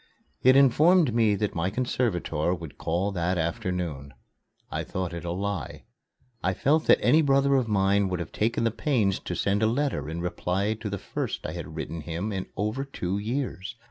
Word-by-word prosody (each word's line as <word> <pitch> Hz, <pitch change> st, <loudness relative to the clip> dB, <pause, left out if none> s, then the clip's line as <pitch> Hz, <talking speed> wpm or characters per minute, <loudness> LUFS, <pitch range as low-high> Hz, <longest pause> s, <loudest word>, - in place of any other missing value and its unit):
It 130 Hz, +1 st, +6 dB
informed 150 Hz, +2 st, +5 dB
me 110 Hz, -3 st, +3 dB
that 105 Hz, +1 st, -1 dB
my 85 Hz, +2 st, 0 dB
conservator 95 Hz, -8 st, 0 dB
would 85 Hz, -4 st, -10 dB
call 90 Hz, +5 st, 0 dB
that 90 Hz, -1 st, -1 dB
afternoon. 85 Hz, -, -3 dB, 0.6 s
I -, -, -2 dB
thought 90 Hz, -2 st, -4 dB
it 85 Hz, -, -5 dB
a 85 Hz, -, -4 dB
lie. 95 Hz, -5 st, -4 dB, 0.6 s
I 95 Hz, +1 st, +1 dB
felt 155 Hz, -, +2 dB
that -, -, +7 dB
any 160 Hz, -, +5 dB
brother 140 Hz, -1 st, +3 dB
of 130 Hz, -3 st, +2 dB
mine 100 Hz, -1 st, +2 dB
would 90 Hz, -2 st, -2 dB
have 85 Hz, -, -5 dB
taken 115 Hz, +2 st, 0 dB
the 115 Hz, -, +2 dB
pains 110 Hz, -6 st, +1 dB
to -, -, -5 dB
send 100 Hz, +1 st, +1 dB
a 110 Hz, -, +4 dB
letter 130 Hz, -, -1 dB
in 80 Hz, +2 st, -4 dB
reply 90 Hz, +4 st, -1 dB
to 110 Hz, -1 st, -6 dB
the 100 Hz, -, -3 dB
first -, -, -4 dB
I -, -, -3 dB
had -, -, -7 dB
written 85 Hz, -1 st, -5 dB
him 85 Hz, +7 st, -4 dB
in 95 Hz, -2 st, -3 dB
over 105 Hz, +7 st, -1 dB
two 100 Hz, -8 st, -3 dB
years. 110 Hz, -3 st, -3 dB
100 Hz, 190 wpm, -27 LUFS, 90-120 Hz, 0.6 s, that